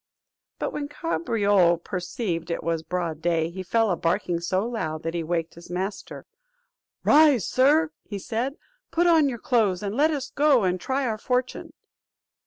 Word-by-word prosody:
But - - -3
when 290 -1 -3
Cabriole 205 - +1
perceived 180 0 -4
it 170 - -3
was 165 -1 -1
broad 165 -1 -3
day, 165 -1 0
he 190 +2 -6
fell 225 +3 +1
a - - +2
barking 170 +1 -1
so 185 +4 -1
loud 160 -10 -4
that 165 - -3
he 170 - -2
waked 165 0 -2
his 170 0 -14
master. 190 +3 -5 0.8
"Rise, 295 - +5
sir," 295 +5 +3 0.3
said 235 +7 -3
he, - - -30 0.3
"put 345 +1 +1
on 320 -4 +5
your 240 - -4
clothes, 215 -6 +1
and 200 0 -3
let 300 +4 +4
us 280 -3 -3
go 280 -5 +3
and 180 -1 0
try 265 +4 -1
our 220 -3 -2
fortune." 250 +2 -2
200 Hz, 170 wpm, -25 LUFS, 170-260 Hz, 0.8 s, Rise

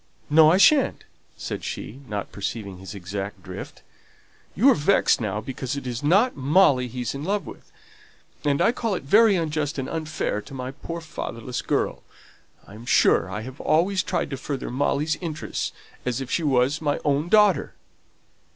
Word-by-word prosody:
"No, 155 0 +7
I 180 - +4
shan't," 275 +6 +4 0.3
said - - -5
she, 120 +6 -6
not 105 -2 -4
perceiving 100 -2 -5
his 95 +2 -9
exact 100 +2 -6
drift. - - -9 0.7
"You 255 +8 +5
are - - +6
vexed 150 -3 +3
now 105 -1 -2
because 130 +3 -4
it 140 - -6
is 120 -1 -4
not 200 - +3
Molly 140 -2 +3
he's 125 0 -4
in 140 +1 -6
love 195 0 -1
with; - - -12 0.7
and 145 +3 +2
I 230 - +4
call 230 -4 -2
it - - -5
very 210 +8 +5
unjust 155 -4 -1
and 135 -1 -3
unfair 155 -9 -3
to 135 - -11
my 130 0 -5
poor 165 +4 -7
fatherless 125 -6 -5
girl. - - -1 0.6
I - - -14
am 115 +3 -11
sure - - +4
I 105 +3 -4
have 130 +4 -9
always 185 +4 +2
tried - - -2
to 135 - -3
further 135 -1 -4
Molly's 145 +4 0
interests 160 -4 -4 0.3
as 125 -1 -2
if 135 -1 -6
she - - +1
was 140 0 +2
my 145 -2 0
own 145 +3 +1
daughter." 210 -3 +4
140 Hz, 175 wpm, -24 LUFS, 125-170 Hz, 0.7 s, No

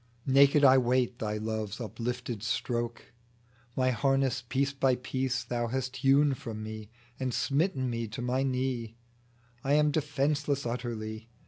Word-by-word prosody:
Naked 140 +2 +5
I 130 -1 +8
wait 125 -1 +1
Thy 105 -1 -2
love's 110 -1 -3
uplifted 120 0 -4
stroke! 120 0 -3 0.6
My 130 0 +2
harness 135 0 +1
piece 135 +3 -1
by 135 -2 +2
piece 130 0 -2
Thou 120 0 -2
hast 130 +1 -3
hewn 140 +1 +4
from 115 -5 -6
me, 110 -1 -7 0.3
And 130 -1 -1
smitten 140 0 0
me 115 -1 -2
to 110 +3 -6
my 125 +2 0
knee; 125 -4 -2 0.7
I 140 - +1
am 150 0 +4
defenceless 145 -1 0
utterly. 115 -2 -4
125 Hz, 140 wpm, -29 LUFS, 115-135 Hz, 0.7 s, I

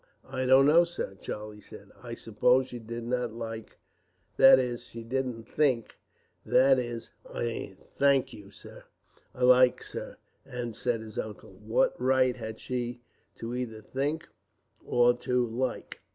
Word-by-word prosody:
"I 130 0 -2
don't 130 +1 +7
know, 160 +4 +6
sir," 170 - -5
Charlie 105 0 -7
said. - - -13
"I - - -7
suppose 125 +4 +2
she 125 - -7
did 115 +1 -6
not 120 -1 -2
like 115 -1 -7 0.6
that 135 0 +8
is, 125 -2 -2
she 115 0 -9
didn't 125 -1 -3
think 130 -2 0 0.5
that 135 0 +4
is 120 -2 -5 0.4
" 95 -4 -9
"Think, 135 -2 +3 0.2
sir! - - -13 0.5
Like, 125 0 +5
sir!" - - -7 0.5
said 115 0 -2
his 110 -1 -7
uncle. 105 -2 -7
"What 105 +4 +1
right 130 -1 +3
had 110 0 -7
she 120 0 -4 0.4
either 115 -1 -4
to - - -26
think 150 +5 -2 0.6
or 120 0 +3
to 125 0 0
like? 120 +3 -3
125 Hz, 140 wpm, -29 LUFS, 115-130 Hz, 0.6 s, that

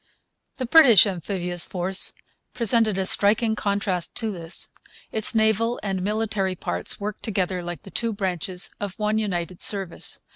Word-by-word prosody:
The 255 - -3
British 245 - +7
amphibious 180 -2 -3
force 185 +1 0 0.4
presented 230 -3 +2
a 190 - 0
striking 220 +3 +3
contrast 200 -4 -2
to 225 -2 -1
this. 170 -3 -4 0.4
Its 220 +1 +2
naval 220 +2 +2
and 195 -2 -2
military 205 -2 -1
parts 90 - -3
worked 210 0 -5
together 190 -4 -1
like 175 -3 -7
the 195 - -12
two 230 -1 -1
branches 185 -2 -2
of 200 -2 -5
one 215 0 0
United 180 -4 -3
Service. 195 -4 0
200 Hz, 145 wpm, -24 LUFS, 180-220 Hz, 0.4 s, British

